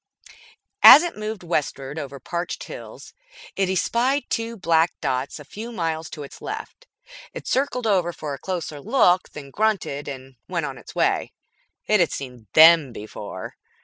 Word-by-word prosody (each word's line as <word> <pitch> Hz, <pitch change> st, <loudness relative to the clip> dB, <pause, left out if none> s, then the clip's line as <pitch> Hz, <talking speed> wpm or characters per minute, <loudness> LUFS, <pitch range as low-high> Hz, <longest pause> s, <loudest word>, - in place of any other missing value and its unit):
As 305 Hz, -, +11 dB
it 345 Hz, -, -3 dB
moved 215 Hz, -2 st, -5 dB
westward 150 Hz, -3 st, -2 dB
over 140 Hz, -2 st, -7 dB
parched 170 Hz, +6 st, -4 dB
hills, -, -, -10 dB, 0.4 s
it 195 Hz, -1 st, 0 dB
espied 245 Hz, +8 st, 0 dB
two 230 Hz, 0 st, -2 dB
black 165 Hz, -2 st, +2 dB
dots 130 Hz, +3 st, -2 dB
a 150 Hz, -, -11 dB
few 220 Hz, -, -8 dB
miles 165 Hz, -6 st, -3 dB
to 150 Hz, -, -8 dB
its 140 Hz, -, -12 dB
left. -, -, -7 dB, 0.5 s
It -, -, -7 dB
circled 255 Hz, -2 st, 0 dB
over 185 Hz, -5 st, +2 dB
for 150 Hz, -3 st, -6 dB
a 140 Hz, -, -7 dB
closer 170 Hz, -6 st, -5 dB
look, 185 Hz, -, +3 dB
then 140 Hz, -2 st, -10 dB
grunted 205 Hz, -9 st, -1 dB
and 130 Hz, -2 st, -9 dB
went -, -, -2 dB
on -, -, -6 dB
its -, -, -13 dB
way. -, -, +1 dB, 0.5 s
It 215 Hz, -1 st, +3 dB
had 175 Hz, -, +3 dB
seen 125 Hz, -5 st, -7 dB
them 160 Hz, -3 st, +7 dB
before. 105 Hz, -4 st, -8 dB
170 Hz, 160 wpm, -23 LUFS, 140-215 Hz, 0.5 s, As